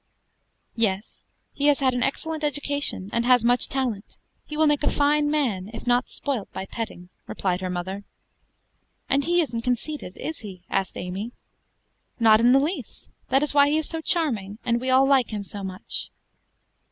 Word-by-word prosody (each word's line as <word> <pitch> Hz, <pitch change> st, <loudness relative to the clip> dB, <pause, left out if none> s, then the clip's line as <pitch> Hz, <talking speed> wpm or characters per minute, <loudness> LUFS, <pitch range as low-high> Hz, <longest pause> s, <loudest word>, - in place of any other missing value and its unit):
"Yes; 215 Hz, -2 st, -1 dB, 0.3 s
he 290 Hz, 0 st, +1 dB
has 290 Hz, -1 st, +5 dB
had 260 Hz, -2 st, +2 dB
an 245 Hz, -, -1 dB
excellent 310 Hz, +4 st, -1 dB
education, 285 Hz, -8 st, -1 dB
and 235 Hz, 0 st, +1 dB
has 245 Hz, -1 st, +4 dB
much 245 Hz, +1 st, +4 dB
talent; 250 Hz, -7 st, -3 dB, 0.3 s
he 300 Hz, -, -5 dB
will 315 Hz, -, +4 dB
make 295 Hz, -1 st, +3 dB
a 290 Hz, -, +2 dB
fine 295 Hz, +1 st, +2 dB
man, 230 Hz, -11 st, 0 dB
if -, -, -8 dB
not 245 Hz, +1 st, +2 dB
spoilt 265 Hz, -8 st, -4 dB
by 190 Hz, -, -5 dB
petting," 195 Hz, -5 st, -6 dB, 0.2 s
replied 185 Hz, -1 st, -1 dB
her 185 Hz, -, -2 dB
mother. 185 Hz, +3 st, -4 dB, 1.0 s
"And 275 Hz, +1 st, +2 dB
he 350 Hz, +1 st, +3 dB
isn't 240 Hz, -8 st, -2 dB
conceited, 245 Hz, -3 st, -3 dB
is 320 Hz, -, -5 dB
he?" 190 Hz, -5 st, -10 dB
asked 195 Hz, -2 st, -1 dB
Amy. 190 Hz, +6 st, -5 dB, 0.9 s
"Not 220 Hz, -2 st, +6 dB
in 240 Hz, +2 st, +5 dB
the 265 Hz, -, +7 dB
least; 295 Hz, -, -4 dB, 0.2 s
that 270 Hz, +2 st, +3 dB
is 295 Hz, -, -1 dB
why 285 Hz, 0 st, +6 dB
he 300 Hz, -, +2 dB
is 315 Hz, -, -1 dB
so 325 Hz, -1 st, -4 dB
charming, 230 Hz, -, 0 dB
and 235 Hz, 0 st, +1 dB
we 260 Hz, -, -2 dB
all 260 Hz, +1 st, +5 dB
like 270 Hz, -3 st, +4 dB
him 210 Hz, -2 st, -4 dB
so 200 Hz, 0 st, -7 dB
much." 185 Hz, -1 st, -4 dB
245 Hz, 180 wpm, -25 LUFS, 205-290 Hz, 1.0 s, the